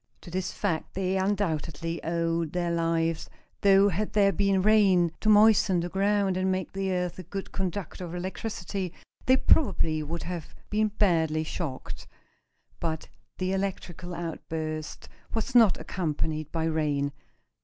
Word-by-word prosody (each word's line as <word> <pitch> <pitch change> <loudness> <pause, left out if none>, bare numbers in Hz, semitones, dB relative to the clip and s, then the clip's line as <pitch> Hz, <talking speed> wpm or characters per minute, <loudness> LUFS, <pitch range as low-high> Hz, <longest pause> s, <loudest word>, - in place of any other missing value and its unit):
To 175 - -11
this 185 +1 -2
fact 170 -6 -2
they 190 0 0
undoubtedly 170 -4 -1
owed 165 -1 -1
their 175 -1 0
lives, 165 -1 0 0.3
though 200 0 +6
had 205 +4 -2
there 200 -2 +5
been 195 0 +2
rain, 195 -5 +5
to 215 - +2
moisten 210 -3 +6
the 175 +1 -2
ground 195 0 +1
and 185 0 +1
make 185 0 -2
the 195 0 -1
earth 180 -1 -2
a - - -6
good 195 +3 -6
conductor 185 -1 -3
of 170 0 -6
electricity, 185 -1 -4 0.3
they 260 +1 +6
probably 170 - +3
would 165 +3 -4
have 170 -3 -6 0.2
been 215 +1 +2
badly 165 -7 +2
shocked. 155 -4 -5 0.7
But 160 -2 -3 0.3
the 185 0 -1
electrical 185 -2 -3
outburst 160 -2 -5 0.3
was 225 +4 -2
not 225 -6 +6
accompanied 155 -3 -2
by 165 -1 -1
rain. 150 -3 0
180 Hz, 145 wpm, -28 LUFS, 165-195 Hz, 0.7 s, though